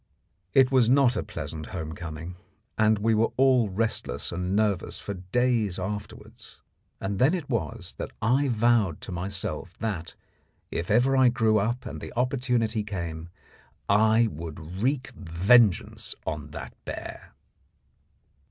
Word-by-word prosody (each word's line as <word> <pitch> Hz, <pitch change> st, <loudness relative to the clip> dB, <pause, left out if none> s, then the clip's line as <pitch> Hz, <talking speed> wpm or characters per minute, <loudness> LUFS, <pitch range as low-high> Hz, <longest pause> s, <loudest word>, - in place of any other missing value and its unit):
It 130 Hz, -1 st, +6 dB
was 125 Hz, -4 st, +4 dB
not 130 Hz, -2 st, +5 dB
a 105 Hz, -, 0 dB
pleasant 80 Hz, -1 st, -6 dB
home 80 Hz, -4 st, -5 dB
coming, 85 Hz, +2 st, -7 dB, 0.4 s
and 110 Hz, 0 st, +3 dB
we 110 Hz, +2 st, +2 dB
were 110 Hz, +1 st, +3 dB
all 130 Hz, -4 st, +4 dB
restless 105 Hz, -, -2 dB
and 90 Hz, +2 st, -2 dB
nervous 105 Hz, -4 st, 0 dB
for 100 Hz, -, -5 dB
days 105 Hz, +1 st, 0 dB
afterwards; 105 Hz, +2 st, -7 dB, 0.4 s
and 95 Hz, 0 st, -3 dB
then 140 Hz, +8 st, +4 dB
it 165 Hz, -6 st, -5 dB
was 115 Hz, -5 st, -3 dB
that -, -, -3 dB
I 130 Hz, +6 st, +2 dB
vowed 115 Hz, -, +2 dB
to -, -, -7 dB
myself 95 Hz, -1 st, -4 dB
that, 95 Hz, -7 st, -4 dB, 0.6 s
if 85 Hz, -, -3 dB
I -, -, +3 dB
ever 130 Hz, +1 st, +5 dB
grew 110 Hz, -3 st, +3 dB
up 120 Hz, +5 st, -1 dB
and -, -, -6 dB
the -, -, -7 dB
opportunity 125 Hz, -3 st, +1 dB
came, 85 Hz, -5 st, -5 dB, 0.6 s
I 110 Hz, +3 st, +4 dB
would 80 Hz, +3 st, -7 dB
wreak 135 Hz, +2 st, 0 dB
vengeance 95 Hz, +4 st, +2 dB
on 75 Hz, -1 st, -4 dB
that 75 Hz, +2 st, -8 dB
bear. -, -, -8 dB
105 Hz, 140 wpm, -27 LUFS, 90-120 Hz, 0.6 s, It